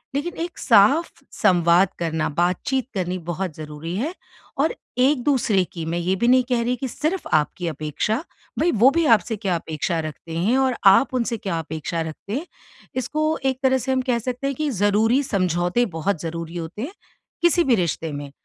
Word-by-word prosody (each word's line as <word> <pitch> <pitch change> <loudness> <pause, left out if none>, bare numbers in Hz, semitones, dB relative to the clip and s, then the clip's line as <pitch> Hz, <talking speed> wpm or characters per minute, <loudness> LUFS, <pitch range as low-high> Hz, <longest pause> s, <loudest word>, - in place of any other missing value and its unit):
लेकिन 335 +5 -2
एक 345 - -7
साफ 270 +9 +4 0.2
संवाद 175 +1 +4
करना, 160 -2 -1
बात-चीत 180 - 0
करनी 185 -2 -2
बहुत 175 0 -3
ज़रूरी 155 +2 -6
है। 295 - -2 0.4
और 290 +4 +2 0.3
एक-दूसरे 255 -7 +3
की, 165 -2 -5
मैं 165 +2 -2
ये 180 +2 0
भी - - +4
नहीं 255 +1 +5
कह 245 -2 +2
रही 245 +2 0
कि 265 +2 -4
सिर्फ़ 315 +9 -2
आपकी 155 +3 +1
अपेक्षा। 155 - -2 0.4
भई, 345 - +3
वो 235 +4 +5
भी 335 -1 +3
आपसे 225 +1 +1
क्या 195 -3 -1
अपेक्षा 165 +1 -2
रखते 155 +1 -6
हैं 210 +10 +2
और 265 -2 +2
आप 230 +8 +6
उनसे 235 -1 0
क्या 190 -5 -3
अपेक्षा 160 +1 -4
रखते 160 +5 -6
हैं, 315 - -5 0.5
इसको 305 +5 0
एक 260 -1 +1
तरह 265 0 +4
से 260 +1 -2
हम 260 0 +2
कह 240 -1 +2
सकते 250 +3 -3
हैं 275 - -2
कि 305 +2 -1
ज़रूरी 220 +3 +2
समझौते 185 - +1
बहुत 170 0 -1
ज़रूरी 165 +1 -5
होते 170 +5 -6
हैं, 320 +8 -6 0.5
किसी 345 0 +4
भी 260 -6 +3
रिश्ते 165 -4 -1
में। 145 -1 -6
205 Hz, 185 wpm, -22 LUFS, 170-260 Hz, 0.5 s, आप